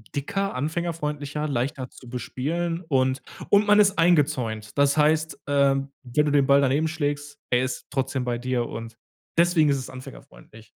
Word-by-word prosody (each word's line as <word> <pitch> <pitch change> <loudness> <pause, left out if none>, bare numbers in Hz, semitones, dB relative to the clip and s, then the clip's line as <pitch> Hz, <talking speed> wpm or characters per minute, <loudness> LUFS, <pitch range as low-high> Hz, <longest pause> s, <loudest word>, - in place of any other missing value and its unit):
dicker, 195 +8 -2
anfängerfreundlicher, 150 -1 -3
leichter 130 0 -2
zu 125 - -14
bespielen 165 +7 -3
und 130 -2 +1 0.3
und 205 +1 +4
man 205 0 +6
ist 200 -1 +4
eingezäunt, 140 -10 +1
das 140 0 +4
heißt, 155 +1 +2
äh, 140 -1 +3 0.3
wenn 130 +4 +1
du 145 - 0
den 140 -2 +3
Ball 140 0 +5
daneben 140 +4 +2
schlägst, 145 -2 -3
er 125 +1 +2
ist 130 -1 -4
trotzdem 135 -1 -1
bei 120 -1 -1
dir 125 -1 -1
und 115 0 -8 0.4
deswegen 170 -3 +4
ist 140 - +2
es 130 - -6
anfängerfreundlich 110 - -13
140 Hz, 160 wpm, -25 LUFS, 130-160 Hz, 0.4 s, man